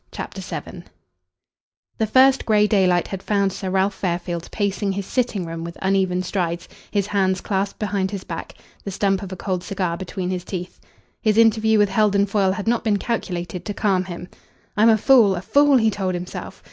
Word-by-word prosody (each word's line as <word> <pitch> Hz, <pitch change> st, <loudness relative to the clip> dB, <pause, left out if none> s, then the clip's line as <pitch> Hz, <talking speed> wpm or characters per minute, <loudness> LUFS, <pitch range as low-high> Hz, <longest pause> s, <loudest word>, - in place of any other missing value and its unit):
CHAPTER -, -, -6 dB
VII -, -, -7 dB, 1.1 s
The 220 Hz, -, +1 dB
first 265 Hz, +4 st, +5 dB
grey 210 Hz, -1 st, +4 dB
daylight 185 Hz, -4 st, +2 dB
had 195 Hz, -1 st, -5 dB
found 200 Hz, -2 st, +1 dB
Sir 190 Hz, -, -4 dB
Ralph 190 Hz, +1 st, +1 dB
Fairfield 175 Hz, -2 st, -3 dB
pacing 200 Hz, -1 st, -1 dB
his 200 Hz, 0 st, -4 dB
sitting 235 Hz, -7 st, -1 dB
room 165 Hz, 0 st, -6 dB
with 170 Hz, 0 st, -7 dB
uneven 190 Hz, -1 st, +1 dB
strides, 175 Hz, -2 st, -2 dB, 0.2 s
his 200 Hz, -2 st, 0 dB
hands 190 Hz, -2 st, +1 dB
clasped 195 Hz, 0 st, -2 dB
behind 200 Hz, -3 st, -1 dB
his 200 Hz, -2 st, -5 dB
back, -, -, -7 dB, 0.3 s
the -, -, -5 dB
stump 195 Hz, 0 st, 0 dB
of 195 Hz, -2 st, -7 dB
a -, -, -4 dB
cold 185 Hz, -1 st, -3 dB
cigar 185 Hz, -3 st, -2 dB
between 185 Hz, 0 st, -4 dB
his 180 Hz, -1 st, -3 dB
teeth. 180 Hz, -1 st, -6 dB, 0.4 s
His 215 Hz, -2 st, +2 dB
interview 220 Hz, -1 st, +4 dB
with 205 Hz, -1 st, +3 dB
Heldon 200 Hz, 0 st, +3 dB
Foyle 195 Hz, -2 st, +1 dB
had 210 Hz, +1 st, -5 dB
not 235 Hz, 0 st, +1 dB
been 215 Hz, -3 st, +2 dB
calculated 180 Hz, -6 st, -3 dB
to 205 Hz, 0 st, -5 dB
calm 190 Hz, -3 st, +1 dB
him. 180 Hz, -1 st, -7 dB, 0.5 s
"I'm 215 Hz, +2 st, +5 dB
a 220 Hz, -, +5 dB
fool 220 Hz, -4 st, +5 dB
a 175 Hz, -, -4 dB
fool," 285 Hz, +5 st, +4 dB
he 220 Hz, -2 st, +3 dB
told 190 Hz, -3 st, -2 dB
himself. 175 Hz, +1 st, -7 dB
195 Hz, 190 wpm, -22 LUFS, 185-210 Hz, 1.1 s, first